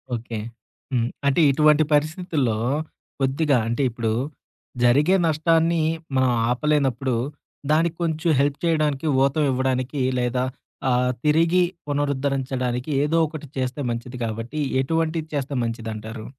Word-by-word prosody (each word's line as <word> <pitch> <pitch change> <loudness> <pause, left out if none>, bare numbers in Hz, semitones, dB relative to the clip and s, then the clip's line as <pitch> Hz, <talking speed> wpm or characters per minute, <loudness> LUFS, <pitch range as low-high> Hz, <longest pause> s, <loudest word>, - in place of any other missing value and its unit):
Okay. 115 -1 -5 0.5
హ్మ్. 120 -2 +1 0.2
అంటే 140 +4 +3
ఇటువంటి 150 +2 +4
పరిస్థితుల్లో 150 - +1 0.6
కొద్దిగా, 135 +1 +2
అంటే 120 +4 0
ఇప్పుడు 115 -1 -2 0.7
జరిగే 145 +10 +4
నష్టాన్ని 165 +1 +2 0.3
మనం 130 -1 +3 0.2
ఆపలేనప్పుడు, 135 -2 +1 0.6
దానికి 165 +2 +2
కొంచెం 160 +1 0
హెల్ప్ 140 0 +1
చేయడానికి, 155 -3 +1 0.2
ఊతమివ్వడానికి 130 -1 0 0.2
లేదా 125 +1 0 0.5
ఆహ్, 125 0 +2
తిరిగి 165 +4 +4 0.2
పునరుద్ధరించడానికి, 135 -2 -1
ఏదో 160 +3 +1
ఒకటి 150 -1 -8
చేస్తే 130 +2 -2
మంచిది 120 +2 -5
కాబట్టి, 115 +6 -4 0.2
ఎటువంటివి 160 +2 -1
చేస్తే 140 -1 -2
మంచిదంటారు? 110 -1 -5
140 Hz, 105 wpm, -23 LUFS, 125-155 Hz, 0.7 s, ఇటువంటి